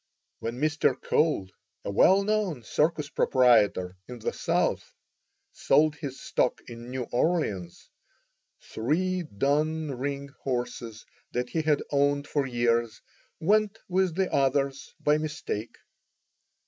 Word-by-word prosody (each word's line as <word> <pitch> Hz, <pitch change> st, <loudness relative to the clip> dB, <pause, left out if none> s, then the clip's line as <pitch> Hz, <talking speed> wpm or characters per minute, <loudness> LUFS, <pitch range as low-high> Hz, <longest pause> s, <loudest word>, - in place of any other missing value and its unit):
When 115 Hz, +2 st, -4 dB
Mr. 155 Hz, +1 st, +1 dB
Cole, 150 Hz, -, +1 dB, 0.3 s
a -, -, -2 dB
well 190 Hz, -, +5 dB
known 200 Hz, -, -1 dB
circus 150 Hz, +4 st, 0 dB
proprietor 105 Hz, -10 st, +3 dB
in 125 Hz, -, -8 dB
the 110 Hz, -, -3 dB
South, -, -, -1 dB, 0.6 s
sold 150 Hz, +2 st, +3 dB
his 140 Hz, -4 st, -7 dB
stock 125 Hz, -, 0 dB
in 120 Hz, 0 st, -9 dB
New 130 Hz, 0 st, -3 dB
Orleans, 120 Hz, -, -1 dB, 0.8 s
three 180 Hz, +10 st, -1 dB
dun 150 Hz, -, 0 dB
ring 140 Hz, +2 st, -4 dB
horses 120 Hz, -3 st, -4 dB, 0.3 s
that 125 Hz, 0 st, -1 dB
he 160 Hz, -, 0 dB
had 150 Hz, -2 st, +1 dB
owned 145 Hz, 0 st, +2 dB
for 145 Hz, -2 st, 0 dB
years 120 Hz, -2 st, 0 dB, 0.4 s
went 210 Hz, +4 st, +2 dB
with 185 Hz, -2 st, +1 dB
the 190 Hz, 0 st, 0 dB
others 135 Hz, 0 st, 0 dB
by 150 Hz, +1 st, +2 dB
mistake. 150 Hz, -8 st, -4 dB
140 Hz, 120 wpm, -27 LUFS, 120-155 Hz, 0.8 s, well